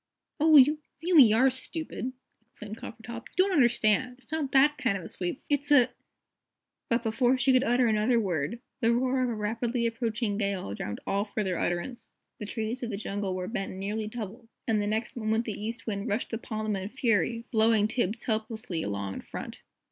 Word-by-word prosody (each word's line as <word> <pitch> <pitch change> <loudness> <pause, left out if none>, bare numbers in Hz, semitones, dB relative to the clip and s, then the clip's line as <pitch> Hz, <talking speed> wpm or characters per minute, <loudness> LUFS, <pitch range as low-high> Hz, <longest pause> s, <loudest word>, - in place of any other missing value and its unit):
"Oh, 310 0 +7
you 295 +3 +6 0.2
really 315 -10 +7
are 255 +5 +5
stupid," 260 -1 -4 0.4
exclaimed 210 -2 -9
Coppertop. 235 +1 -8
"You 370 - +6
don't 395 - -1
understand. 245 - +3
It's 265 +3 -17
not 310 -4 -2
that 290 +2 +4
kind 250 -9 +1
of 185 - -8
a - - -7
sweep. 180 +7 -4
It's 290 0 0
a 255 -4 +6 0.5
" - - -60
But 235 0 +1
before 245 +3 +2
she 260 +1 +4
could 255 0 +4
utter 245 -1 +3
another 225 +2 +3
word 185 +1 -2 0.2
the 230 -2 +3
roar 255 +1 +1
of 250 - +1
a 235 - -2
rapidly 230 +3 -1
approaching 230 -2 -1
gale 200 - -2
drowned 105 0 -5
all 200 +1 0
further 205 -4 -2
utterance. 175 +8 -3 0.3
The 210 - -5
trees 225 +3 -3
of 240 - -3
the 200 - -3
jungle 200 -2 -3
were 185 0 -3
bent 195 -3 -3
nearly 205 +3 -3
double, 225 +1 -7 0.2
and 220 -2 +2
the 205 - -1
next 220 +2 -2
moment 220 0 0
the 220 - -3
East 225 +3 -5
Wind 205 0 -3
rushed 210 +3 -2
upon 215 -1 -4
them 215 -1 0
in 190 - -5
a - - -5
fury, 230 -2 0
blowing 220 -2 +4
Tibbs 225 -1 -1
helplessly 220 -6 -2
along 100 -5 -3
in - - -6
front. - - -8
225 Hz, 200 wpm, -28 LUFS, 210-250 Hz, 0.5 s, Oh